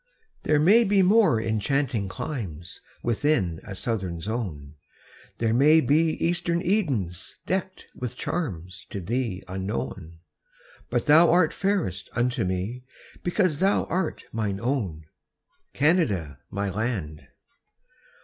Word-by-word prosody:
There 150 Hz, -1 st, +2 dB
may 205 Hz, +10 st, +6 dB
be 200 Hz, -2 st, +3 dB
more 185 Hz, -, +5 dB
enchanting 110 Hz, 0 st, 0 dB
climes 95 Hz, -, -6 dB, 0.2 s
Within 115 Hz, -, +1 dB
a 100 Hz, -, -7 dB
southern 95 Hz, -6 st, -2 dB
zone; 85 Hz, -9 st, -4 dB, 0.6 s
There 115 Hz, -1 st, +1 dB
may 150 Hz, +6 st, +6 dB
be 155 Hz, +3 st, +3 dB
eastern 175 Hz, 0 st, +1 dB
Edens 135 Hz, -, -1 dB
deckt 190 Hz, 0 st, -3 dB
With 125 Hz, -2 st, -5 dB
charms 95 Hz, -, -4 dB
to 100 Hz, -, -5 dB
thee 110 Hz, 0 st, -2 dB
unknown; 95 Hz, -3 st, -4 dB, 0.7 s
But -, -, 0 dB
thou 160 Hz, +3 st, +7 dB
art 170 Hz, -2 st, +4 dB
fairest 190 Hz, -, -1 dB
unto 120 Hz, 0 st, 0 dB
me, 95 Hz, +7 st, -3 dB, 0.4 s
Because 175 Hz, -4 st, +1 dB
thou 195 Hz, +2 st, +3 dB
art 175 Hz, -1 st, -1 dB
mine 105 Hz, -3 st, -2 dB
own, 110 Hz, -, -2 dB, 0.7 s
Canada, 110 Hz, -, +1 dB
my 100 Hz, 0 st, -2 dB
land. 95 Hz, -8 st, -3 dB
120 Hz, 115 wpm, -26 LUFS, -, 0.7 s, thou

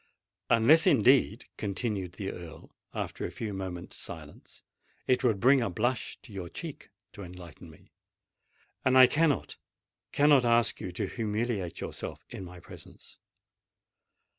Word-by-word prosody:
"Unless, 125 Hz, +9 st, +5 dB
indeed," 125 Hz, -3 st, +4 dB
continued 100 Hz, -3 st, -3 dB
the 95 Hz, 0 st, -4 dB
Earl, 85 Hz, -3 st, -11 dB, 0.2 s
after -, -, -5 dB
a -, -, -2 dB
few 110 Hz, -3 st, -5 dB
moments' 95 Hz, -2 st, -6 dB
silence, -, -, -9 dB, 0.4 s
"it 130 Hz, +1 st, +2 dB
would 115 Hz, -6 st, +2 dB
bring 130 Hz, +4 st, +5 dB
a 115 Hz, -, 0 dB
blush 120 Hz, +6 st, -2 dB
to 105 Hz, -, -13 dB
your 90 Hz, -3 st, -6 dB
cheek 160 Hz, -, -8 dB, 0.2 s
to 100 Hz, -, -11 dB
enlighten 90 Hz, -3 st, -11 dB
me; 75 Hz, -, -19 dB, 0.9 s
and 130 Hz, 0 st, +4 dB
I 130 Hz, -, +10 dB
cannot—cannot 145 Hz, -, +1 dB
ask 115 Hz, -2 st, +2 dB
you 90 Hz, -, -5 dB
to 90 Hz, -, -3 dB
humiliate 110 Hz, -4 st, -3 dB
yourself -, -, -6 dB
in -, -, -7 dB
my 90 Hz, 0 st, -10 dB
presence!" -, -, -14 dB
110 Hz, 135 wpm, -29 LUFS, 95-130 Hz, 0.9 s, I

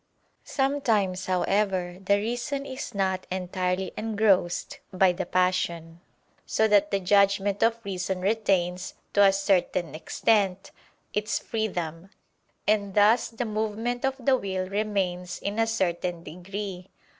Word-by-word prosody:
Sometimes, 225 Hz, -10 st, 0 dB
however, 185 Hz, -1 st, 0 dB
the 200 Hz, +1 st, +3 dB
reason 245 Hz, +6 st, -3 dB
is 260 Hz, -5 st, -6 dB
not 190 Hz, -1 st, -1 dB
entirely 185 Hz, 0 st, -2 dB
engrossed 210 Hz, -5 st, +1 dB
by 185 Hz, 0 st, +4 dB
the 175 Hz, -, -4 dB
passion, 170 Hz, -2 st, 0 dB, 0.4 s
so 220 Hz, -, +2 dB
that 205 Hz, -1 st, +4 dB
the 200 Hz, -, +1 dB
judgment 200 Hz, +1 st, +2 dB
of 230 Hz, 0 st, +3 dB
reason 190 Hz, -1 st, -2 dB
retains, 190 Hz, -3 st, 0 dB, 0.2 s
to 205 Hz, -, +5 dB
a 195 Hz, -, +7 dB
certain 190 Hz, -5 st, +1 dB
extent, 195 Hz, +3 st, 0 dB, 0.4 s
its 210 Hz, +2 st, 0 dB
freedom: 180 Hz, -6 st, -3 dB, 0.6 s
and 200 Hz, -2 st, +1 dB
thus 215 Hz, +3 st, +4 dB
the 235 Hz, +1 st, -4 dB
movement 220 Hz, +3 st, -2 dB
of 270 Hz, 0 st, +1 dB
the 265 Hz, +1 st, +3 dB
will 190 Hz, -5 st, -3 dB
remains 190 Hz, -3 st, -2 dB
in 205 Hz, +2 st, -3 dB
a 225 Hz, -, +3 dB
certain 180 Hz, -5 st, -1 dB
degree. 185 Hz, +2 st, -6 dB
195 Hz, 125 wpm, -26 LUFS, 180-215 Hz, 0.6 s, a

